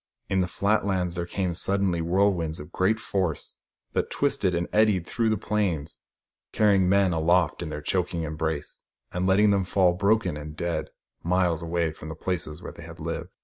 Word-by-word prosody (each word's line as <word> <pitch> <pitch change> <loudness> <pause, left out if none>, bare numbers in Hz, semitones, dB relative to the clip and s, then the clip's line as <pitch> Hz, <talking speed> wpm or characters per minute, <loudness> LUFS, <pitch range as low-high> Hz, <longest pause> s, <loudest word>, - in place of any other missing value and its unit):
In 95 - +1
the 90 - +2
flat 100 +4 +1
lands 95 -3 0
there 85 -1 -3
came 90 -1 -1
suddenly 95 0 0
whirlwinds 85 -2 +1
of 75 +3 -10
great 105 +6 +1
force, 95 -8 -3 0.3
that - - 0
twisted 90 -2 +1
and 85 0 -1
eddied 105 -5 +3
through 115 +3 0
the 110 - +1
plains, 95 -7 -1 0.5
carrying 100 -4 +3
men 100 -2 +3
aloft 85 +3 +2
in 85 - -4
their 75 -1 -6
choking 85 0 -1
embrace, 80 -1 -3 0.3
and 90 +1 -1
letting 100 +2 +5
them 100 -1 +2
fall, 90 -1 +3
broken 100 -2 +1
and 75 +1 -8
dead, 85 -1 -2 0.3
miles 90 -2 +1
away 85 -1 0
from 80 0 -10
the 80 - -6
places 80 -3 -3
where - - -6
they - - -13
had - - -11
lived. - - -4
90 Hz, 185 wpm, -26 LUFS, 80-100 Hz, 0.5 s, letting